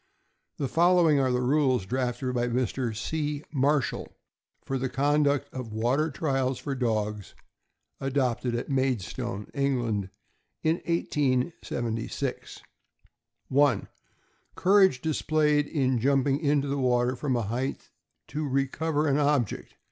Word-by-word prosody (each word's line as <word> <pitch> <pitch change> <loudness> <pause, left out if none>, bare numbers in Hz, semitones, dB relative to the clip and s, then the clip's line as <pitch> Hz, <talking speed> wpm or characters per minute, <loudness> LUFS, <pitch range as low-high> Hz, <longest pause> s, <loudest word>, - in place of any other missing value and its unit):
The 140 - -1
following 170 -1 +4
are 130 -1 +2
the 125 0 0
rules 130 -5 +2
drafted 125 +2 -2
by 120 -1 0
Mr. 120 -1 -1
C. 150 +4 -2
Marshall 140 -1 0 0.5
for 135 -1 -2
the 130 0 -1
conduct 145 +1 +2
of 125 -4 -6
water 125 +8 +1
trials 135 -3 -1
for 140 - -4
dogs, 105 -5 -2 0.6
adopted 130 -3 0
at 120 - -3
Maid 130 -6 +1
stone, 105 -2 -5
England, 120 -8 0 0.5
in 160 +1 +2
1876: 130 -7 -2 0.9
1. 140 -5 +3 0.7
Courage 190 -8 +4
displayed 150 -1 +1
in 130 -5 +1
jumping 135 +2 +2
into 145 -2 +1
the 140 0 -1
water 125 0 +2
from 130 0 -1
a 120 - 0
height 125 +6 -3 0.4
to" 150 -1 -3
recover 145 +3 0
an 140 +1 +2
object. 145 -7 0
135 Hz, 120 wpm, -27 LUFS, 125-145 Hz, 0.9 s, following